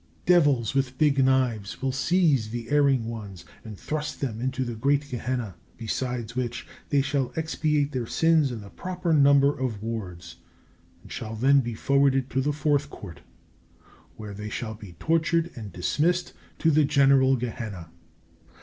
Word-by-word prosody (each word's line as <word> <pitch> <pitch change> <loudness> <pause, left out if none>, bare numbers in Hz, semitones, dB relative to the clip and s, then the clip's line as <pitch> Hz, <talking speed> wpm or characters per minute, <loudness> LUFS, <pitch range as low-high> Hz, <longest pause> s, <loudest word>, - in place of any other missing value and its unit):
Devils 145 - +3
with 135 -1 -1
big 140 -2 +3
knives 125 -6 0
will 135 0 -1
seize 135 -3 +2
the 115 +1 -6
erring 140 -5 +3
ones 100 -6 -7 0.2
and 110 -3 -9
thrust 150 +3 -4
them 115 -5 -3
into 130 0 -2
the 120 - -4
great 140 +5 0
Gehenna; 125 -4 -3 0.2
besides 120 +1 -4
which 125 -2 -3 0.2
they 140 -2 +2
shall 140 -2 -1
expiate 155 -2 0
their 125 -4 -3
sins 160 -3 +2
in 115 -3 -6
the 100 - -12
proper 180 -2 -3
number 140 -1 +5
of 115 -6 -4
wards, 95 -7 -6 0.7
and - - -15
shall 110 0 -5
then 135 +5 +4
be 120 -3 -3
forwarded 135 +1 +2
to 135 - +1
the 145 +3 0
Fourth 150 -1 0
Court 80 -4 -10 1.0
where 105 -2 -8
they 105 +1 -6
shall 115 -1 -4
be 105 -5 -12
tortured 165 - 0
and 105 -4 -8
dismissed 170 - 0 0.2
to 160 - +2
the 155 +1 +4
general 135 -2 +4
Gehenna. 110 -8 -6
130 Hz, 160 wpm, -26 LUFS, 115-145 Hz, 1.0 s, number